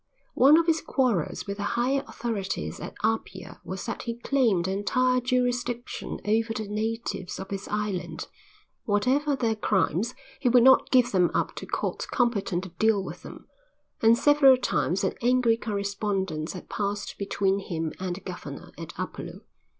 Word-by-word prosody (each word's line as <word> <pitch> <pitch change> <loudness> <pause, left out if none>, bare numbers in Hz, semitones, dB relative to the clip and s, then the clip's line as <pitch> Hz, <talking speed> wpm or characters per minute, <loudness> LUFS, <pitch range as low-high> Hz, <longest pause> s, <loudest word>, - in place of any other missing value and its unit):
One 280 +5 +7
of 335 - +3
his 325 -1 +2
quarrels 240 - 0
with 200 -1 -4
the - - -5 0.2
higher 265 +3 +1
authorities 215 -5 -3
at - - -7
Apia 215 -4 -2
was 190 0 -6
that - - -4
he 235 -1 -4
claimed 235 -8 +1
entire 255 +6 +1
jurisdiction 245 -1 -1
over 225 +2 +1
the 215 -1 -3
natives 210 -2 -3
of 195 +1 -7
his 195 0 -4
island. 210 -3 -3 0.6
Whatever 260 +8 +2
their 230 -4 +1
crimes 210 0 0 0.2
he 255 - +2
would 245 0 +6
not 265 +1 +6
give 250 -2 +4
them 180 -3 +3
up - - 0
to - - -6
courts - - -2
competent 200 -7 0
to 190 - -7
deal 220 -3 +3
with - - -8
them, - - -11 0.6
and 225 +1 +6
several 280 -2 +6
times 195 -6 0
an 190 - +1
angry 245 -1 +3
correspondence 200 -6 -2
had 180 - -9
passed 205 0 -3
between 200 -1 0
him 165 -4 -3
and 185 -1 -3
the 200 - -10
Governor - - -8
at - - -8
Upolu. - - -6
220 Hz, 160 wpm, -27 LUFS, 195-250 Hz, 0.6 s, One